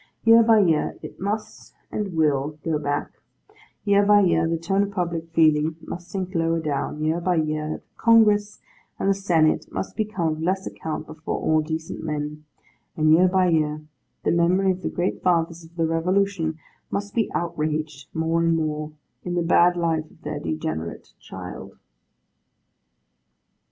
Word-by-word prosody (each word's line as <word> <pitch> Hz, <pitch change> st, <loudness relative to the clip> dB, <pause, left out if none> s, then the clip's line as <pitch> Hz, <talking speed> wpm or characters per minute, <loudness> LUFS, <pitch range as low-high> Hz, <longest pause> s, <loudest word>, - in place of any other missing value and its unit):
Year 230 Hz, 0 st, +7 dB
by 225 Hz, -1 st, +5 dB
year, 165 Hz, -5 st, +1 dB
it -, -, -9 dB
must 215 Hz, +3 st, -5 dB, 0.2 s
and 200 Hz, -5 st, -3 dB
will 150 Hz, -1 st, +1 dB
go 160 Hz, -2 st, 0 dB
back; 145 Hz, 0 st, -2 dB, 0.7 s
year 200 Hz, 0 st, +4 dB
by 205 Hz, 0 st, +6 dB
year, 165 Hz, -3 st, +3 dB
the 165 Hz, 0 st, 0 dB
tone 195 Hz, +4 st, 0 dB
of 200 Hz, -, 0 dB
public 170 Hz, -4 st, -3 dB
feeling 155 Hz, -1 st, +3 dB
must 175 Hz, +2 st, -8 dB
sink 185 Hz, -1 st, -4 dB
lower 165 Hz, -1 st, +1 dB
down; 150 Hz, 0 st, -3 dB
year 160 Hz, +2 st, 0 dB
by 180 Hz, +1 st, +1 dB
year, 155 Hz, -1 st, -1 dB
the -, -, -19 dB, 0.2 s
Congress 210 Hz, -2 st, +4 dB, 0.4 s
and -, -, -1 dB
the 195 Hz, -, +5 dB
Senate 170 Hz, -5 st, +1 dB
must -, -, -4 dB
become 215 Hz, -7 st, -1 dB
of 155 Hz, 0 st, -3 dB
less 190 Hz, +3 st, 0 dB
account 155 Hz, -1 st, -5 dB
before 155 Hz, +1 st, -5 dB
all 155 Hz, 0 st, +2 dB
decent 160 Hz, +1 st, -5 dB
men; 150 Hz, 0 st, -4 dB, 0.5 s
and 155 Hz, 0 st, +4 dB
year 180 Hz, +3 st, +6 dB
by 185 Hz, 0 st, +3 dB
year, 155 Hz, -2 st, 0 dB, 0.4 s
the -, -, +2 dB
memory 180 Hz, +3 st, +3 dB
of 185 Hz, 0 st, -4 dB
the -, -, -2 dB
Great 175 Hz, +1 st, -2 dB
Fathers 170 Hz, -1 st, +1 dB
of 165 Hz, +1 st, -17 dB
the 165 Hz, -1 st, +1 dB
Revolution 165 Hz, 0 st, 0 dB, 0.3 s
must 205 Hz, 0 st, -3 dB
be 225 Hz, -3 st, 0 dB
outraged 155 Hz, -4 st, -2 dB
more 165 Hz, +1 st, 0 dB
and 165 Hz, 0 st, +3 dB
more, 155 Hz, -1 st, -3 dB, 0.3 s
in 175 Hz, 0 st, -3 dB
the 175 Hz, -, +1 dB
bad 175 Hz, +1 st, +4 dB
life 160 Hz, -2 st, 0 dB
of -, -, -23 dB
their -, -, -4 dB
degenerate 80 Hz, 0 st, -4 dB
child. -, -, -9 dB
165 Hz, 165 wpm, -24 LUFS, 155-185 Hz, 0.7 s, Year